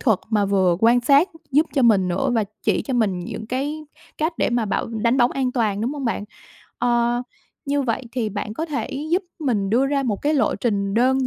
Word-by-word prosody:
thuật 220 -8 +2
mà 210 -2 +2
vừa 190 -3 +2
quan 235 +2 +5
sát 280 +8 +4 0.2
giúp 300 +4 +3
cho 270 - +2
mình 205 -6 +4
nữa 190 +10 0
và 225 -2 +2 0.2
chỉ - - +1
cho 265 - -3
mình 210 -7 +1
những 185 +5 -6
cái 285 +6 -3 0.3
cách 315 +3 0
để - - +1
mà 240 -1 +1
bảo 200 - -1
đánh 230 +2 0
bóng 245 -1 +4
an 260 -2 -1
toàn, 215 -5 0
đúng 245 +5 -1
hông 285 -3 -5
bạn? 225 -3 -1 0.5
Ờ, 240 0 +1 0.4
như 285 0 0
vậy 245 0 -2
thì 240 -4 -1
bạn 210 +1 -5
có 320 +5 -3
thể 295 -3 -3 0.2
giúp 360 +3 +2 0.2
mình 225 - 0
đưa 255 +5 +3
ra 280 0 0
một 220 -6 -2
cái 300 +2 +2
lộ 285 - +2
trình 200 -4 -1
đơn 260 +3 +3
240 Hz, 225 wpm, -22 LUFS, 215-275 Hz, 0.5 s, quan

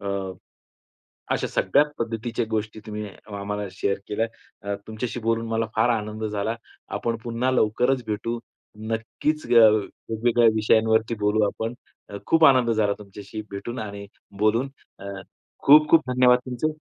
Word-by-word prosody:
अ, 100 - -5 1.3
अशा - - -1
सगळ्या 145 - +3
पद्धतीच्या 115 +1 -2
गोष्टी 110 0 -3
तुम्ही 105 0 -5 0.3
आम्हाला 105 +1 -3
शेअर 100 +1 -1
केल्या. 110 +2 0 0.4
अ, 100 0 -2
तुमच्याशी 115 +2 -4
बोलून 115 0 0
मला 115 0 0
फार 110 +2 +3
आनंद 110 +1 -6
झाला. 105 +2 -2 0.3
आपण 115 -1 -2
पुन्हा 120 +2 0
लवकरचं 125 +2 +2
भेटू. 110 +2 -2 0.4
नक्कीचं 115 +7 -2
ग - - +4 0.6
वेगवेगळ्या 115 +1 +3
विषयांवरती 110 +1 +3
बोलू 105 +1 +2
आपण. 110 +3 -3 0.4
अ, 100 - -7
खूप 165 -1 +4
आनंद 130 -5 +6
झाला 110 -2 +2
तुमच्याशी 100 +1 -9
भेटून 110 +5 -6
आणि 100 -2 -6 0.3
बोलून 110 +5 +2 0.3
अ, - - -10 0.6
खूप-खूप 150 -1 +6
धन्यवाद 125 0 +5
तुमचे. 130 +5 -1
115 Hz, 135 wpm, -24 LUFS, 105-120 Hz, 1.3 s, आनंद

